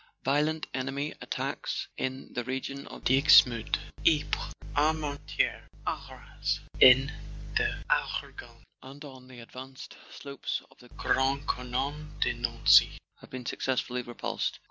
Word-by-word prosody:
"Violent 150 +3 +1
enemy 135 +3 -3
attacks - - -3
in 130 +1 -4
the 120 - -2
region 135 +2 -4
of - - -11
Dixmude, 135 -4 +5 0.3
Ypres, 155 -3 +1 0.2
Armentieres, 150 -1 0 0.2
Arras, - - -3 0.2
in 130 +2 +8 0.4
the - - 0
Argonne, - - -2 0.2
and 140 +3 -11
on 130 -2 -12
the 130 -2 -12
advanced 130 +3 -10
slopes 140 -1 -5
of 135 - -23
the 125 - -16
Grand 135 +3 0
Couronne 140 +4 -3
de - - +2
Nancy, 120 -1 +4 0.2
have - - -15
been 130 -1 -7
successfully 125 -1 -1
repulsed. 120 -1 -3
135 Hz, 120 wpm, -29 LUFS, 125-145 Hz, 0.4 s, in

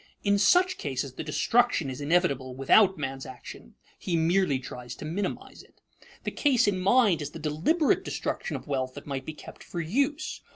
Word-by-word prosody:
In 200 -1 +3
such 360 - +4
cases 135 -2 -3
the - - -6
destruction 200 - +2
is 130 +1 -6
inevitable 140 -5 +1
without 190 +9 +4
man's 135 -2 -4
action; 125 - -11 0.2
he 175 - -2
merely 165 -2 +2
tries 125 -1 -8
to - - -8
minimize 190 +6 -4
it. - - -23 0.4
The - - -3
case 265 -7 +2
in 195 -2 +1
mind 200 -3 +3
is 145 - -4
the 165 - -10
deliberate 160 - +1
destruction - - -3
of - - -6
wealth 130 -2 -2
that - - -9
might 135 -2 -5
be 155 - -5
kept - - -12
for 175 - -6
use. 280 - -1
160 Hz, 180 wpm, -27 LUFS, 135-205 Hz, 0.4 s, such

